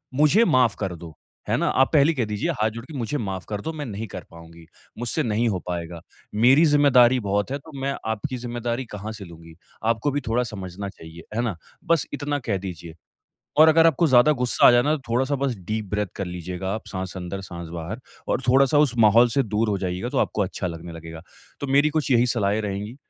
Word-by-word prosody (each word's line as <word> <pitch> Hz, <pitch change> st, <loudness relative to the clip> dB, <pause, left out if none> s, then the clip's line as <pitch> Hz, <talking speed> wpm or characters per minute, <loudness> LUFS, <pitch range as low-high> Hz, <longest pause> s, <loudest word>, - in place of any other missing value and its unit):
मुझे 155 Hz, -, +4 dB
माफ 130 Hz, -8 st, +3 dB
कर 95 Hz, -4 st, -3 dB
दो, 80 Hz, -2 st, -11 dB, 0.3 s
है -, -, +2 dB
ना? -, -, 0 dB
आप 135 Hz, 0 st, +2 dB
पहले 150 Hz, +2 st, +5 dB
कह 130 Hz, -6 st, -1 dB
दीजिए 105 Hz, -1 st, -2 dB
हाथ 110 Hz, -, +3 dB
जोड़ 115 Hz, +2 st, -8 dB
के 155 Hz, -, -12 dB
मुझे 125 Hz, +4 st, -2 dB
माफ 95 Hz, -6 st, -4 dB
कर 105 Hz, -1 st, -3 dB
दो 160 Hz, -, -4 dB
मैं 150 Hz, -2 st, -5 dB
नहीं 110 Hz, -1 st, -5 dB
कर 95 Hz, -2 st, -8 dB
पाऊँगी। 85 Hz, 0 st, -14 dB, 0.3 s
मुझसे 120 Hz, +6 st, -1 dB
नहीं 115 Hz, 0 st, 0 dB
हो 95 Hz, -4 st, -1 dB
पाएगा 85 Hz, -1 st, -5 dB, 0.3 s
मेरी 130 Hz, +9 st, +5 dB
ज़िम्मेदारी 130 Hz, -4 st, +5 dB
बहुत 100 Hz, +3 st, -1 dB
है 140 Hz, -, -1 dB
तो 160 Hz, +3 st, -15 dB
मैं 140 Hz, 0 st, -1 dB, 0.2 s
आपकी 125 Hz, +4 st, -4 dB
ज़िम्मेदारी 120 Hz, +1 st, -3 dB
कहाँ 105 Hz, -1 st, -7 dB
से 105 Hz, -2 st, -9 dB
लूँगी? 85 Hz, -1 st, -13 dB, 0.3 s
आपको 115 Hz, +5 st, +1 dB
भी 145 Hz, +1 st, -1 dB
थोड़ा 120 Hz, +2 st, +1 dB
समझना 100 Hz, -3 st, -6 dB
चाहिए। 80 Hz, -3 st, -12 dB
है 115 Hz, -, +1 dB
ना? 115 Hz, -6 st, -2 dB, 0.3 s
बस 165 Hz, -3 st, +2 dB
इतना 145 Hz, 0 st, -2 dB
कह 110 Hz, -6 st, -2 dB
दीजिए 85 Hz, -3 st, -8 dB, 0.6 s
और 155 Hz, +1 st, +8 dB
अगर 165 Hz, +1 st, +6 dB
आपको 165 Hz, +1 st, +3 dB
ज़्यादा 130 Hz, +3 st, +6 dB
गुस्सा 125 Hz, -3 st, +3 dB
आ -, -, +9 dB
जाए 120 Hz, 0 st, +5 dB
ना 150 Hz, +3 st, +2 dB
तो 140 Hz, -, -13 dB
थोड़ा-सा 130 Hz, +4 st, +1 dB
बस 135 Hz, -2 st, -1 dB
डीप 110 Hz, 0 st, -2 dB
ब्रेथ 105 Hz, -1 st, 0 dB
कर 100 Hz, -, -2 dB
लीजिएगा 90 Hz, +2 st, -5 dB
आप 110 Hz, -, -6 dB
साँस 95 Hz, -1 st, -5 dB
अंदर 90 Hz, +2 st, -5 dB
साँस 85 Hz, -3 st, -8 dB
बाहर 85 Hz, +7 st, -6 dB, 0.3 s
और -, -, +1 dB
थोड़ा-सा 135 Hz, +3 st, +4 dB
उस 145 Hz, -4 st, +3 dB
माहौल 115 Hz, +2 st, +6 dB
से 135 Hz, +4 st, +1 dB
दूर 110 Hz, -1 st, -1 dB
हो 100 Hz, -, +1 dB
जाइएगा 90 Hz, -1 st, -3 dB
तो -, -, -1 dB
आपको -, -, +1 dB
अच्छा -, -, -3 dB
लगने 85 Hz, 0 st, -7 dB
लगेगा। 80 Hz, 0 st, -9 dB, 0.4 s
तो 140 Hz, -, -3 dB
मेरी 140 Hz, +3 st, +3 dB
कुछ 155 Hz, -2 st, -1 dB
यही 120 Hz, -1 st, +4 dB
सलाहें 105 Hz, -1 st, +1 dB
रहेंगी 105 Hz, +4 st, -4 dB
115 Hz, 225 wpm, -24 LUFS, 95-135 Hz, 0.6 s, आ